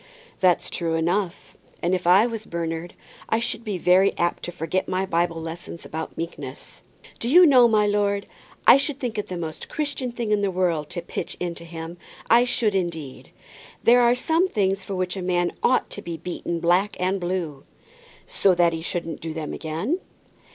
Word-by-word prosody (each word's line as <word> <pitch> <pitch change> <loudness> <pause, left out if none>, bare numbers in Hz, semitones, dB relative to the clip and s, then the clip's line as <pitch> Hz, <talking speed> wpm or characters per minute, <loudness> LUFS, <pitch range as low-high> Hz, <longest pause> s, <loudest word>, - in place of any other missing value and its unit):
"That's 180 -2 +2
true 165 -2 -1
enough; 175 +3 -1 0.2
and 175 +2 0
if 180 -1 -1
I 190 +5 +7
was 225 -2 -4
Bernard, 170 0 -4 0.3
I 225 - +2
should 235 0 -3
be 210 -4 -3
very 185 +3 +4
apt 175 0 0
to 175 - -5
forget 175 +2 -2
my 185 +1 0
Bible 170 -2 0
lessons 165 +1 -7
about 160 +1 -6
meekness." 145 -5 -7 0.4
"Do 235 - -2
you 355 +6 +8
know, 255 -6 +7
my 215 -2 +3
lord, 205 -1 +1 0.4
I - - +9
should 275 0 -2
think 235 -4 -3
it 210 - -4
the 180 - -5
most 160 -2 -6
Christian 285 -4 -3
thing 235 -2 -3
in 210 -1 +3
the 200 - +1
world 175 -5 0
to 175 - -4
pitch - - -5
into 170 -1 -4
him; 165 +1 -8 0.3
I 240 +1 +7
should, 225 -3 +1
indeed. 165 -7 -3 0.5
There 245 +1 +6
are 240 0 +5
some 325 +8 +2
things 195 - 0
for 195 - -5
which 185 0 -2
a 190 - -4
man 175 -1 +1
ought 255 - +2
to 205 - -4
be 170 -4 -5
beaten 170 0 -4
black 175 +5 +2
and 185 +2 0
blue." 175 -6 -3 0.6
"So 190 -2 +2
that 170 -1 +3
he 165 - -4
shouldn't 170 -1 -4
do 160 -1 -5
them 155 -2 -4
again?" 170 - -2
180 Hz, 190 wpm, -24 LUFS, 170-210 Hz, 0.6 s, I